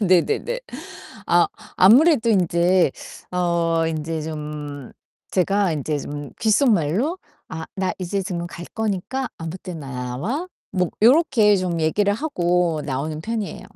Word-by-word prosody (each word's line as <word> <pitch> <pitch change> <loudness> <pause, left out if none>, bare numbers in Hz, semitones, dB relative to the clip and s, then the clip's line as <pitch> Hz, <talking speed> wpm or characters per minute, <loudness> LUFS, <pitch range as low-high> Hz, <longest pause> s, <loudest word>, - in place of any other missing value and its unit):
네네네. 190 - +2 0.7
아. - - +4 0.3
아무래도 235 - +6
인제 175 -3 +3 0.4
어 170 -2 +1
인제 160 0 -3
좀 150 -3 -6 0.4
제가 195 -1 +2
인제 150 0 -2
좀 145 0 -6
귓속말로 220 - +2 0.3
"아 160 0 -6
나 190 -1 0
이제 190 +2 -2
지금 175 -3 -4
갈 175 0 -9
거니까 220 +5 -2
아무 165 +1 -5
때나 165 -8 -8
나와." 135 - -3 0.2
뭐 180 -3 0
요렇게 240 -6 +5
좀 180 -3 -1
얘기를 200 +6 +2
하고 175 - 0
나오는 150 +3 -3
편이에요. 220 +2 -4
180 Hz, 245 characters per minute, -22 LUFS, 160-210 Hz, 0.7 s, 아무래도